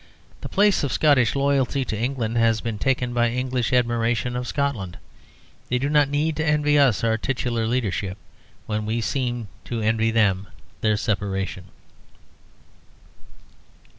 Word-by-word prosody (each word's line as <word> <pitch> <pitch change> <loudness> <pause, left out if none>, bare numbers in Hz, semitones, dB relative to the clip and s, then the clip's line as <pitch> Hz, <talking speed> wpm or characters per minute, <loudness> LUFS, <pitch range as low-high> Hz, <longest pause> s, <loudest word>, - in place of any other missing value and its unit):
The - - -6
place 205 -3 +3
of 140 - -1
Scottish 140 -6 +3
loyalty 140 -1 +1
to 110 - -3
England 120 0 -2
has 115 -1 +3
been 110 -2 -4
taken 125 -1 0
by 120 -1 +2
English 125 0 -1
admiration 120 -1 +1
of 125 0 -3
Scotland. 125 -11 -2 0.7
They 125 - +1
do 135 +3 -1
not 145 -2 +4
need 150 +2 0
to 160 - 0
envy 150 -1 +3
us 130 -8 +3
our 110 -1 +1
titular 120 -3 -1
leadership, 105 -5 -1 0.5
when 105 -1 -3
we 115 +2 0
seem 120 0 -2 0.2
to 115 -2 -3
envy 110 +1 +2
them 100 -4 +2 0.3
their 110 -1 +2
separation. 95 -3 -2
120 Hz, 140 wpm, -23 LUFS, 110-135 Hz, 0.7 s, not